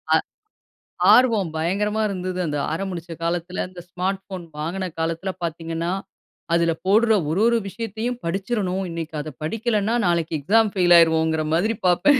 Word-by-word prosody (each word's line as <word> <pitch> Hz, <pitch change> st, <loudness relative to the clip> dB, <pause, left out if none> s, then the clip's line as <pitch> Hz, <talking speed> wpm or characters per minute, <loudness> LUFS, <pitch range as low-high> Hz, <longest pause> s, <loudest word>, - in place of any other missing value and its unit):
அ -, -, +7 dB, 1.0 s
ஆர்வம் 225 Hz, -9 st, +4 dB
பயங்கரமா 210 Hz, +6 st, 0 dB
இருந்தது. 185 Hz, -1 st, -3 dB
அந்த 145 Hz, -1 st, -2 dB, 0.2 s
ஆரமுடிச்ச 175 Hz, -2 st, -4 dB
காலத்தில, 175 Hz, +2 st, -2 dB
இந்த 175 Hz, -1 st, -9 dB
ஸ்மார்ட் 190 Hz, +2 st, -2 dB
போன் 180 Hz, -2 st, -5 dB
வாங்கின 180 Hz, +4 st, -3 dB
காலத்தில 165 Hz, +4 st, -2 dB
பார்த்தீங்கனா, 165 Hz, +1 st, -3 dB, 0.6 s
அதில 170 Hz, 0 st, +3 dB
போட்ற 220 Hz, +4 st, +4 dB, 0.2 s
ஒரு 190 Hz, +6 st, +1 dB
ஒரு 235 Hz, 0 st, +3 dB
விஷயத்தையும் 230 Hz, +3 st, -4 dB
படிச்சுர்றனும். 195 Hz, +1 st, -1 dB
"இன்னைக்கி 165 Hz, -1 st, -5 dB
அத 155 Hz, -, -6 dB
படிக்கலனா, 220 Hz, +4 st, 0 dB
நாளைக்கு 165 Hz, -2 st, 0 dB
எக்ஸாம் 215 Hz, +6 st, +3 dB
பெயில் 175 Hz, -1 st, +6 dB
ஆயிருவோம்"ங்கிற 160 Hz, -1 st, +3 dB
மாதிரி 215 Hz, +6 st, +1 dB
பார்ப்பேன். 270 Hz, +10 st, +4 dB
185 Hz, 140 wpm, -23 LUFS, 165-210 Hz, 1.0 s, அ